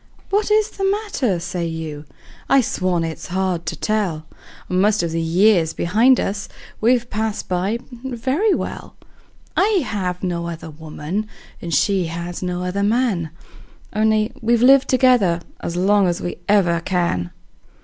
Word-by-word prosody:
"What 415 +1 +1
is 430 0 +3
the 390 - -5
matter?" 390 - 0
say 175 0 -3
you. 160 -2 -6 0.4
I 275 - +6
swan 185 -7 0
it's 165 0 -5
hard 180 -2 -1
to 165 - -2
tell! 185 -5 -1 0.4
Most 200 +2 +2
of 170 - -2
the 165 0 -1
years 170 0 +3
behind 230 +9 +4
us 195 0 -3 0.3
we've 240 +1 +2
passed 215 0 -2
by 185 +5 0 0.3
very 265 - 0
well; - - -6 0.6
I 395 -4 +3
have 185 -4 -3
no 170 -2 -2
other 165 -1 -7
woman, 160 +6 -5 0.4
she 180 +4 +2
has 170 +1 -5
no 180 -1 -2
other 180 +2 -2
man 205 -6 +1 0.6
Only 215 +1 +2
we've 235 +1 +2
lived 270 +1 +6
together 250 -10 +4 0.2
as 170 - -4
long 195 +2 +3
as 175 -1 -1
we 175 - -4
ever 180 -5 +3
can. 170 - -1
190 Hz, 145 wpm, -20 LUFS, 170-230 Hz, 0.6 s, I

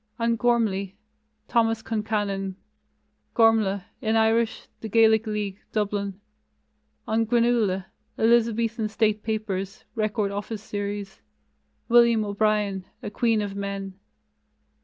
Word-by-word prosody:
On 230 0 +1
Gormlai: 215 -5 +1 0.5
Thomas 225 -2 +1
Concannon, 205 -3 -2 0.8
Gormflath 220 -4 +3 0.2
(in 220 +1 +1
Irish; 225 0 +2
The 220 - -6
Gaelic 220 0 +4
League, 210 -2 -3
Dublin). 200 -2 -1 0.9
On 220 +1 +2
Granuaile: 225 -5 +2 0.3
Elizabethan 230 -1 +2
State 215 -1 +1
Papers 210 -3 -3
(Record 215 -2 -1
Office 205 +1 -5
Series); 205 -2 -5 0.7
William 235 -2 +5
O'Brien, 205 -2 0 0.2
A 205 - -5
Queen 225 -1 +1
of 200 -1 -5
Men. 200 -1 -4
215 Hz, 100 wpm, -25 LUFS, 200-225 Hz, 0.9 s, William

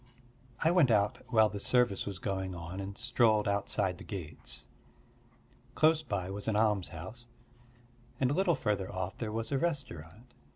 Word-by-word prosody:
I 165 - +4
went 175 -7 +5
out 105 -2 +2
while 110 -3 +5
the 105 -1 -5
service 120 -2 +2
was 100 -2 -4
going 95 -1 -3
on 85 +3 -6
and 100 0 -6
strolled 115 -4 +3
outside 100 -2 0
the - - -9
gates. 85 -6 -6 1.1
Close 155 0 +4
by 95 -10 -3
was 100 +1 -4
an 110 - +1
almshouse, 105 +1 -1 0.9
and 130 -1 +2
a - - +2
little 180 0 +3
further 105 -7 -1
off 95 0 -4
there 110 -2 -3
was 115 +3 -3
a 135 - +1
restaurant. 125 - -4
105 Hz, 160 wpm, -32 LUFS, 95-125 Hz, 1.1 s, went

